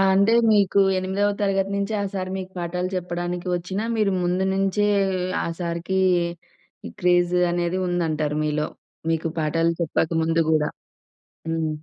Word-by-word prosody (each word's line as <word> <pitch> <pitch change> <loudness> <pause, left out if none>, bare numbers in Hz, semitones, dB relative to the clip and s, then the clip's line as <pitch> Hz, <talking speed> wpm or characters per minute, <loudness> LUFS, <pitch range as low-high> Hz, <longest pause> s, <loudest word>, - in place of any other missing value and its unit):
అంటే 200 +4 +4 0.2
మీకు 200 -2 +3 0.2
ఎనిమిదవ 190 +2 0
తరగతి 195 -1 +1
నుంచి 200 +2 -2
ఆ - - -1
సారు 185 -1 -3
మీకు 190 0 -6
పాఠాలు 180 +1 -2
చెప్పడానికి 175 0 -3
వచ్చినా, 185 +4 -3
మీరు 210 -2 +2
ముందు 180 +2 +1
నుంచే 195 +1 +1 0.6
ఆ - - -2
సారుకి 170 +2 -2 1.0
క్రేజ్ 175 0 +3 0.2
అనేది 175 +1 -1
ఉందంటారు 155 -4 -1
మీలో. 150 0 0 0.4
మీకు 165 0 0
పాఠాలు 165 +2 +1
చెప్పక 160 -1 0
ముందు 165 +1 +1
గూడా. 150 -1 +2 0.8
హ్మ్. 160 -1 0
175 Hz, 130 wpm, -23 LUFS, 165-190 Hz, 1.0 s, అంటే